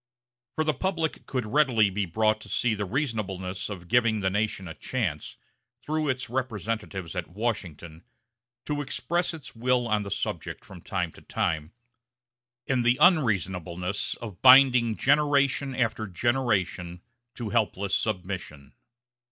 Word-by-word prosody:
For 155 - +1
the 155 -1 +1
public 165 0 -2
could 125 -4 -2
readily 115 -4 +3
be 100 0 -1
brought 110 +5 +1
to - - -11
see 120 -3 +1
the 105 -1 -2
reasonableness 100 -7 -3
of 90 -4 -7
giving 115 +1 +3
the 95 0 +1
nation 105 -2 -1
a 85 - -6
chance, 90 - -3 0.5
through 155 0 -1
its 130 -1 -2
representatives 110 -7 -3
at 90 -2 -3
Washington, 85 -6 -4 0.6
to 145 -1 -2
express 170 +5 -1
its 160 -6 -10
will 125 +1 +1
on 105 -2 +1
the 100 - -5
subject - - -4
from - - -12
time - - -2
to - - -16
time, 80 +1 -2 0.9
and 130 -2 +1
the 120 +1 +3
unreasonableness 95 - +1
of 105 -6 -9
binding 125 -3 +7
generation 140 -1 +2
after 115 -3 0
generation 95 -5 -1 0.3
to 115 -4 -5
helpless 100 -3 0
submission. 90 -8 -3
110 Hz, 135 wpm, -27 LUFS, 95-130 Hz, 0.9 s, binding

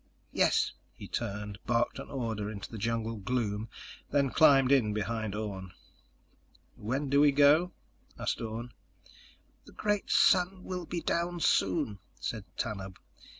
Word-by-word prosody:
"Yes." - - +2 0.2
He - - -9
turned, 105 -2 -4
barked 120 0 +1
an - - -8
order 110 -6 -3
into 100 -2 -7
the 115 - -6
jungle 115 +1 -1
gloom, 110 -1 -2 0.4
then 140 -2 +2
climbed 135 -4 +6
in 120 -7 +4
behind 110 0 -2
Orne. 95 -4 -5 1.0
"When 130 +7 -2
do 140 +1 +4
we 145 -1 +6
go?" 145 +5 +5 0.5
asked - - -2
Orne. 115 +1 -5 0.9
"The - - -15
great 210 -1 -1
sun 185 0 +4
will 180 -2 -5
be 170 - -3
down 175 +1 -1
soon," 100 - +1 0.2
said 110 -3 -4
Tanub. 95 -4 -4
115 Hz, 135 wpm, -30 LUFS, 105-145 Hz, 1.0 s, climbed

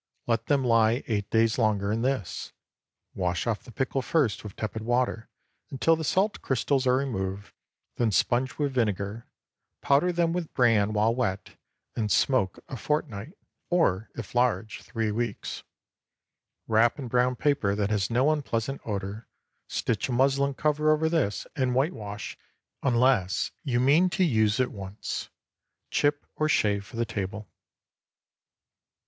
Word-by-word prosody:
Let 115 -1 0
them 140 -2 +2
lie 115 +1 +3
eight 105 -3 -2
days 115 +1 +2
longer 105 -3 +1
in 110 +1 0
this. 130 -7 -2 0.6
Wash 90 -2 -1
off 115 -3 -1
the 125 - -13
pickle 130 +3 -1
first 130 -3 +1
with 105 -3 -8
tepid 110 0 -4
water, 120 -1 0 0.4
until 150 +5 +2
the 160 - -4
salt 195 +7 +1
crystals 135 +1 0
are 125 0 +4
removed; 100 -7 -3 0.4
then 120 -2 +2
sponge 125 +5 +1
with 145 -2 -1
vinegar, 105 -2 -1 0.5
powder 145 +6 +3
them 170 -1 +1
with 175 -3 -4
bran 110 -5 +3
while 110 +2 +3
wet, 100 -6 -2 0.4
and 105 -3 -1
smoke 120 -9 +2
a 130 - -6
fortnight, 140 - -3 0.3
or, 110 - +2
if 115 -5 -7
large, 120 -3 0
three 115 -3 -2
weeks. 115 +2 -3 1.1
Wrap 115 +1 +3
in 135 -4 -5
brown 125 +1 +2
paper 120 -9 +1
that 105 0 -1
has 100 -2 +1
no 130 +6 +3
unpleasant 135 -3 -2
odor, 100 +1 -4 0.4
stitch 110 +2 -1
a - - -1
muslin 135 +2 +2
cover 150 +1 +1
over 155 +1 +2
this, 145 -12 0
and 130 -4 0
whitewash, 115 - -2 0.4
unless 120 -7 +2
you 120 -5 0
mean 150 +8 +4
to 185 - +1
use 110 - +2
at 130 - +1
once. 100 +1 -6 0.6
Chip 145 0 +1
or 155 0 +1
shave 100 -7 +2
for 100 - -13
the 115 0 0
table. 105 -1 -5
120 Hz, 145 wpm, -27 LUFS, 105-140 Hz, 1.1 s, are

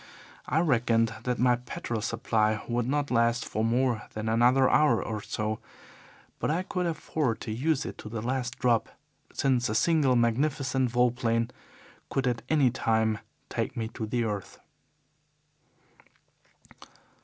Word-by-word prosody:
I 160 - +2
reckoned 115 -7 +2
that 125 -1 0
my 125 -1 +3
petrol 120 -2 -5
supply 110 -1 0
would 120 0 -1
not 145 +1 0
last 115 0 +2
for 110 - -2
more 120 -1 +1
than 110 0 -4
another 125 +4 +4
hour 150 -7 +4
or 110 -2 -4
so, 110 +1 -3 0.8
but - - -1
I 165 +4 0
could 180 -2 -2
afford 155 -6 -1
to - - -5
use 135 +5 0
it - - -7
to 110 - -8
the 115 0 -4
last 125 0 -2
drop, 120 -3 +2 0.4
since 130 -4 +1
a 110 - -1
single 145 0 +3
magnificent 130 +2 +1
vol 125 +1 +3
plane 115 -1 0 0.6
could 135 - -1
at 120 -2 0
any 145 -6 +4
time 110 -3 +1 0.3
take - - -3
me 110 -1 -2
to 110 -2 -5
the 120 +2 0
earth. 105 -3 -4
120 Hz, 145 wpm, -28 LUFS, 115-130 Hz, 0.8 s, another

